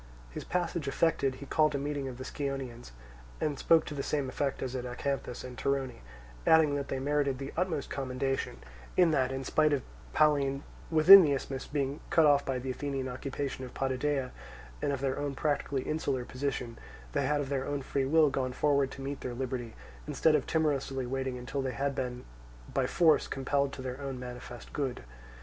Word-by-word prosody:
His - - -6
passage 175 -4 -2
effected, 140 -2 +1
he 140 - -9
called 155 +1 +2
a - - +2
meeting 140 -1 -2
of 125 -2 -6
the 130 - -6
Scionaeans 135 -4 -4 0.5
and 145 -3 -1
spoke 165 -1 +4
to - - -6
the 140 - -3
same 140 -2 -1
effect 140 +1 -2
as 130 0 -3
at 125 - -2
Acanthus 125 0 -3
and 125 -1 -8
Torone, 135 -1 -1 0.5
adding 160 -2 +6
that 140 -1 -2
they 135 - -2
merited 140 0 +1
the 135 +1 -6
utmost 165 -4 -1
commendation, 135 0 -2 0.3
in 175 -3 +6
that, 130 -4 +2
in 135 0 -3
spite 155 +3 +3
of 140 - 0 0.3
Pallene 140 -3 +3 0.3
within 170 +5 +10
the 150 -5 +3
isthmus 135 -1 -4
being 140 0 -2
cut 160 - +5
off 145 -1 +5
by 135 -1 -1
the 130 +1 -3
Athenian 135 0 -3
occupation 130 +1 -4
of 125 - -9
Potidæa 135 0 -1 0.5
and - - +1
of 135 -2 -2
their 135 -1 -1
own 145 -1 -2
practically 145 -2 0
insular 140 -5 -1
position, 125 -3 -3 0.3
they - - 0
had 150 0 +2
of 140 -2 -3
their 135 -1 -1
own 145 -1 -2
free 135 0 -1
will 155 0 +5
gone 130 -1 -1
forward 140 -1 +2
to 135 - -9
meet 140 +1 -4
their 125 -1 -4
liberty 125 -2 -4 0.3
instead 150 +2 +3
of 150 -3 +1
timorously 140 -4 0
waiting 130 0 -2
until 125 +3 -3
they 130 -1 -2
had 140 +2 -1
been 125 -2 -4 0.5
by - - +1
force 160 -3 +4
compelled 140 +1 0
to 130 - -7
their 130 +1 -5
own 135 -2 -4
manifest 125 -1 -9
good. 135 - -2
135 Hz, 195 wpm, -30 LUFS, 130-145 Hz, 0.5 s, within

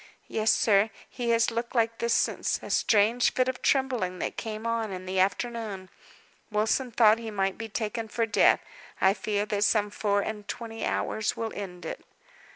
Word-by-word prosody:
"Yes, 220 0 +2
sir. 210 0 +3 0.2
He 245 -2 -4
has 230 0 +3
looked 235 +2 -4
like 230 -1 +1
this 235 0 +2
since - - 0
a - - -6
strange 225 +3 +3
fit 255 0 +2
of 260 -1 -3
trembling 250 -10 +1
that - - -3
came 220 0 -5
on 230 -2 -1
in 185 -1 -6
the 185 0 -1
afternoon. 200 -1 -1 0.6
Wilson 220 +4 +1
thought 225 -1 +5
he 230 -1 -6
might 195 -2 -1
be 225 0 -7
taken 225 +1 -3
for 230 +1 0
death. 220 - +4 0.4
I 190 0 +5
fear 205 0 -1
that 210 -1 0
some 210 -1 +2
four 205 -1 +1
and 210 -2 -5
twenty 225 -2 -6
hours 220 0 -1
will 225 -1 -3
end 180 -4 -7
it." - - -6
220 Hz, 180 wpm, -27 LUFS, 205-230 Hz, 0.6 s, thought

